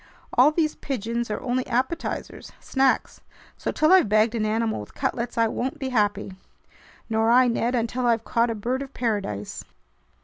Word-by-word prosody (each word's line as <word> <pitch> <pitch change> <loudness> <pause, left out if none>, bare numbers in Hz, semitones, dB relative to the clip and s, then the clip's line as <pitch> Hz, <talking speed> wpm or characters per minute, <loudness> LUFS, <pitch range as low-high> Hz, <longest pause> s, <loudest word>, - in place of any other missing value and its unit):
"All 255 +4 +6
these 310 -1 0
pigeons 235 -2 -3
are 210 - -2
only 255 0 -1
appetizers, 260 +7 -3
snacks. 265 -1 0 0.3
So - - -3
till 310 +4 +3
I've 370 - +5
bagged 215 +2 +3
an 215 -2 0
animal 220 - 0
with 105 - -10
cutlets, 240 0 -2
I 230 0 +4
won't 260 +6 -3
be 270 -3 -4
happy!" 205 -5 0 0.7
"Nor 225 0 +1
I, 250 +2 +6
Ned, 240 +1 0
until 245 +1 -1
I've 230 -1 +2
caught 235 +1 +1
a 230 - -2
bird 245 +5 -2
of 275 0 -8
paradise." 200 - -3
235 Hz, 170 wpm, -24 LUFS, 220-255 Hz, 0.7 s, All